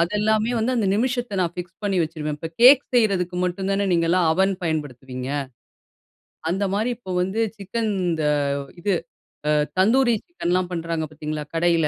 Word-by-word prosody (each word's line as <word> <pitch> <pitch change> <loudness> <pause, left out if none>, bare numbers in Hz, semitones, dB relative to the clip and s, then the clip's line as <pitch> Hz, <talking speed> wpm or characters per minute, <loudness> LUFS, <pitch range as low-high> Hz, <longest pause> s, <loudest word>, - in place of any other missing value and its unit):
அத 170 +1 +2
எல்லாமே 215 +2 +2
வந்து 235 +3 +1
அந்த 220 -4 +1
நிமிஷத்த 240 -2 -1
நான் 175 -1 -1
ஃபிக்ஸ் 175 -1 -7
பண்ணி 200 -2 +1
வச்சுருவேன். 155 -2 -3
இப்போ 165 - -5
கேக் 260 +3 +9
செய்றதுக்கு 195 -7 +2
மட்டும் 190 +2 -2
தானே 195 +1 +1
நீங்கலாம் 170 0 +3
அவன் 190 +4 +2
பயன்படுத்துவீங்க! 130 -5 -4 1.2
அந்த 195 +3 0
மாரி 220 +4 0
இப்போ 190 -7 -7
வந்து, 190 +5 -1 0.2
சிக்கன் 215 +3 -2 0.2
இந்த 160 -2 -1 0.6
இது, 200 +2 +1 0.6
அ - - +4 0.3
தந்தூரி 240 +5 +4
சிக்கன்லாம் 185 - -1
பண்றாங்க 165 -2 -2
பாத்தீங்களா 155 0 -4
கடையில. 165 -1 +3
185 Hz, 150 wpm, -23 LUFS, 165-215 Hz, 1.2 s, கேக்